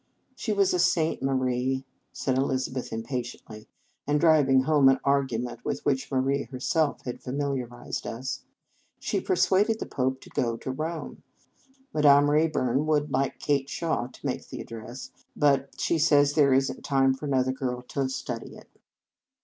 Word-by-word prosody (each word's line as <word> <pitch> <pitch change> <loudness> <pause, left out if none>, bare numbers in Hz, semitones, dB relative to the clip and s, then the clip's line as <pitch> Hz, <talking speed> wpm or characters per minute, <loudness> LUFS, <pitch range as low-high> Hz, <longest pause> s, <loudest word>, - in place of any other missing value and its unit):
" - - -45
She 235 - -3
was 200 -2 +2
a 180 - +1
saint, 170 -2 +2
Marie," 130 0 0 0.3
said 130 - -1
Eliz 130 -1 0
abeth 130 -1 -5
impatiently, 115 -2 -6 0.4
and 145 0 +2
driving 145 -5 +5
home 145 -2 +5
an 135 - +4
argument 130 -4 0
with - - -3
which 135 0 0
Marie 135 +1 +1
her 130 +2 -8
self 155 +3 0
had 125 - -6
familiarized 130 -3 -4
us. 130 +4 -4 0.3
" - - -41
She - - -1
per 375 - 0
suaded 210 - +3
the - - -5
Pope 130 0 -1
to - - -14
go 115 -2 0
back 115 - -8
to 130 - -3
Rome. 155 +4 -5 0.7
Madame 145 -1 +5
Rayburn 150 -3 +1
would 150 -1 +1
like 135 +1 0
Kate 140 -2 0
Shaw 160 -8 -1
to - - -15
make - - -3
the - - -7
address; 115 +3 -8 0.2
but 140 -2 +1
she 165 - +1
says 145 -2 +4
there 145 -3 +4
is 135 +1 +3
n 130 - -9
t - - -15
time 135 -1 +2
for 140 +3 -6
another 130 -2 +2
girl 125 -2 -3
to 135 -2 -1
study 130 +1 -5
it." - - -15
135 Hz, 180 wpm, -27 LUFS, 130-150 Hz, 0.7 s, driving